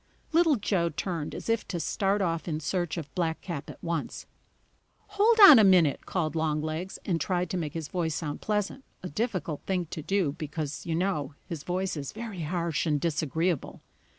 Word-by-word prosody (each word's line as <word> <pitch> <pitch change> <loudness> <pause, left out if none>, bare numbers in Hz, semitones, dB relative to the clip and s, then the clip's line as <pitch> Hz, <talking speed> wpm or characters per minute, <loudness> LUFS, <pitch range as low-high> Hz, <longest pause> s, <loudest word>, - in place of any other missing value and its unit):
Little 325 -2 +4
Joe 195 -6 0
turned 165 -1 -4
as - - -7
if 230 -1 0
to 175 - -3
start 195 +3 0
off 165 -1 -1
in 155 -2 -1
search 175 +2 -2
of 145 -5 -6
Blackcap 165 -1 -3
at - - -11
once. 170 -2 -3 0.8
"Hold 420 +3 +3
on 300 - +12
a - - +7
minute!" 180 -7 +4
called 165 -4 -1
Longlegs, 155 +3 -2
and 170 -4 0
tried 180 -2 -1
to 185 - -1
make 155 -3 -4
his 160 -3 -3
voice 165 -4 -1
sound 150 -3 -4
pleasant, 210 +5 -1 0.2
a 180 - -4
difficult 185 - -2
thing 185 -2 0
to 155 - -4
do, 185 -2 +1
because, 155 0 -5
you 165 - 0
know, 160 -6 -1
his 165 -4 -6
voice 185 +3 -2
is 140 -3 -5
very 220 -5 -6
harsh 170 0 -1
and 150 -2 +2
disagreeable. 160 +1 -1
170 Hz, 180 wpm, -28 LUFS, 155-195 Hz, 0.8 s, on